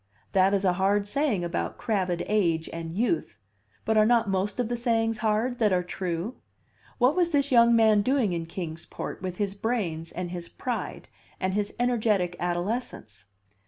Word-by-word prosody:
That 195 +1 +4
is 195 0 0
a 180 - +4
hard 200 +1 +2
saying 240 -6 0
about 170 - -3
crabbed 185 -5 -1
age 170 -6 +1
and 165 -1 -5
youth, 185 - 0 0.5
but 220 0 +2
are 215 - +6
not 235 -2 +3
most 195 +4 -1
of 245 - +1
the 240 - -1
sayings 225 -2 0
hard 225 +3 0
that 215 -3 +3
are 180 -1 +2
true? 180 +5 -4 0.6
What 260 +4 +3
was 355 -2 +2
this 285 -3 +1
young 235 -1 +6
man 220 -2 +5
doing 250 -4 +1
in 165 -1 -3
Kings 165 -1 -6
Port - - -6
with 185 -1 -4
his 200 -2 -1
brains, 195 -7 -2
and 180 -1 -5
his 175 -1 -6
pride, 245 -2 -4 0.3
and 185 0 -1
his 205 0 -2
energetic 215 -7 +1
adolescence? 175 - -3
205 Hz, 175 wpm, -27 LUFS, 180-235 Hz, 0.6 s, are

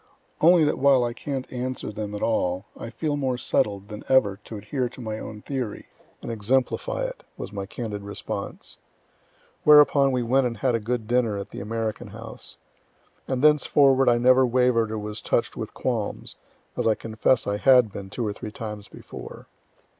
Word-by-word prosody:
"Only 170 +1 +6
that 150 - +1
while 135 -2 +5
I 120 0 -1
can't 135 +1 -5
answer 125 -2 -4
them 105 0 -5
at 105 - -4
all, 95 -4 0
I - - -7
feel 150 +4 -2
more 130 -3 -1
settled 100 -4 -1
than 105 0 -8
ever 105 -7 +4
to 110 - -7
adhere 125 +5 -2
to - - -13
my 110 -2 -4
own 105 -1 -8
theory, 130 -7 -4 0.3
and - - -4
exemplify 130 - 0
it," - - -7
was - - -7
my 100 -1 -4
candid 105 -2 -5
response. 100 0 -6 0.8
Whereupon 145 -2 +6
we 125 -1 0
went 130 +2 +3
and 115 -2 -5
had 125 +3 +1
a 115 - +1
good 115 0 -3
dinner 120 -3 +1
at 100 - -7
the - - -7
American 110 0 -3
House. - - -8 0.7
And 130 0 -2
thenceforward 140 -3 +5
I 120 - +4
never 130 +2 +5
waver'd 125 -2 +2
or 110 - -2
was 105 0 -5
touch'd - - 0
with - - -6
qualms, - - -3 0.4
(as - - 0
I 110 - +4
confess 110 +2 +1
I 100 0 -1
had 125 -1 +5
been 100 -1 -7
two 120 +4 -3
or 105 - -2
three 105 +1 -8
times 105 -2 -7
before.) - - -10
120 Hz, 185 wpm, -25 LUFS, 105-130 Hz, 0.8 s, Only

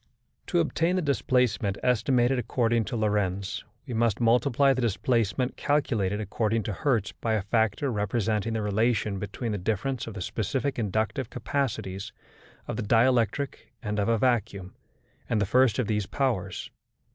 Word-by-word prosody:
To - - +1
obtain 165 - +1
the 185 - +1
displacement 125 -6 +1
estimated 125 +1 +2
according 115 -2 +1
to - - -4
Lorentz, 100 -3 -1 0.2
we 130 - -6
must 115 -2 +1
multiply 125 +4 +3
the 130 - -2
displacement 120 +2 0
calculated 110 -9 0
according 110 +2 -1
to 105 - -3
Hertz 110 -1 0
by 115 - -2
a 105 - -1
factor 110 +5 +1
representing 105 +1 -1
the 110 -1 -1
relation 105 -1 +1
between 105 +4 -4
the 105 - -2
difference 110 +7 -2
of 110 - -7
the 95 - -5
specific 125 +9 -2
inductive 110 +4 -1
capacities 115 -7 -3 0.6
of - - -4
the - - -1
dielectric 120 +4 +1
and 105 -1 -2
of 100 - +1
a 115 - +3
vacuum, 110 -6 0 0.6
and 110 - +1
the 105 - +2
first 125 +3 +3
of 125 - +1
these 105 -2 -1
powers. 105 -9 -2
115 Hz, 155 wpm, -27 LUFS, 105-125 Hz, 0.6 s, multiply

